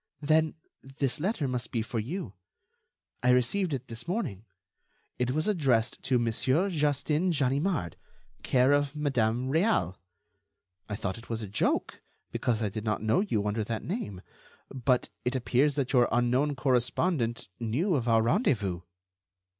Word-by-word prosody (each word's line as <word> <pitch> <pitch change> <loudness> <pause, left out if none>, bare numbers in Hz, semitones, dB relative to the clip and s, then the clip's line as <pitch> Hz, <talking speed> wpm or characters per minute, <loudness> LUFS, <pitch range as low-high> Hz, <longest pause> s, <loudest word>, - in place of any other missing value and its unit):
"Then, 155 +1 +3 0.4
this 135 -2 -1
letter 175 -4 0
must 125 -3 -3
be 115 -2 0
for 115 0 -3
you. 150 - -4 0.9
I 125 - +2
received 125 +10 +2
it 130 -2 -3
this 115 +5 -8
morning. 170 - -3 0.7
It 125 0 +1
was 155 +7 0
addressed 135 - +1
to 130 -1 +2
'Mon. 130 - +1
Justin 150 +2 +1
Ganimard, 140 - 0 0.4
care 130 +1 +3
of 145 0 +2
Madame 125 -4 0
Réal.' 140 - +2 0.9
I 105 - -2
thought 100 +1 -3
it 115 - -15
was 115 -1 -3
a - - -5
joke, 100 - -1 0.3
because 115 -2 0
I 105 - 0
did 110 +2 -5
not 110 -1 -1
know 110 +10 +3
you 115 - 0
under 105 +1 0
that 110 +1 -4
name, 105 - -4 0.5
but 130 -1 +1
it 125 +2 -1
appears 130 +3 +2
that 140 -2 -1
your 125 -2 +5
unknown 125 +5 +2
correspondent 125 0 0
knew 130 - 0
of 125 -6 0
our 115 -1 +4
rendezvous." 110 - +1
125 Hz, 150 wpm, -29 LUFS, 115-150 Hz, 0.9 s, your